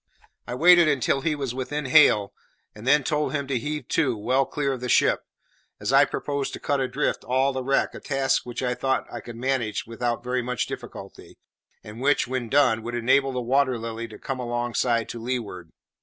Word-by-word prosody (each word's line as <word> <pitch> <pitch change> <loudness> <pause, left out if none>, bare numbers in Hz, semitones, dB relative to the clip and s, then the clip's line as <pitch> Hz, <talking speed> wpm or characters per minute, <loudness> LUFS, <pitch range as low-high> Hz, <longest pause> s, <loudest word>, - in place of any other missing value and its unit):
I 125 - -4
waited 175 +3 +6
until 140 -1 +1
he 155 +1 0
was 135 -4 -4
within 140 +3 -4
hail, 105 -5 +5 0.4
and 105 +4 -10
then 145 +1 +5
told 150 +2 -1
him 140 -2 -1
to 130 -2 -1
heave 150 +1 -4
to 130 -8 +1
well 130 +6 +1
clear 140 -2 -1
of 130 - -6
the 125 - -4
ship, - - +4 0.6
as 105 +6 -2
I 140 +1 +7
proposed 140 -1 -3
to - - -6
cut 145 -1 -1
adrift 135 +2 -1
all 130 +2 +1
the 130 0 -3
wreck, 135 +1 +1
a - - -8
task 135 -1 0
which 120 +1 -6
I 125 -1 0
thought 130 +1 -1
I 120 - -4
could 120 +1 -10
manage 120 -3 -1
without 120 +1 -3
very 125 0 -1
much 125 -1 -2
difficulty, - - -10 0.5
and 105 +3 -10
which, 140 -1 +2
when 125 -2 -3
done, 125 -5 +3
would 120 +2 -5
enable 135 +3 +2
the 125 -1 -3
Water 130 +1 +1
Lily 115 0 -5
to 110 - -12
come 135 -1 -5
alongside 120 -1 -1
to 120 - -6
leeward. 110 -9 -4
130 Hz, 200 wpm, -25 LUFS, 120-140 Hz, 0.6 s, I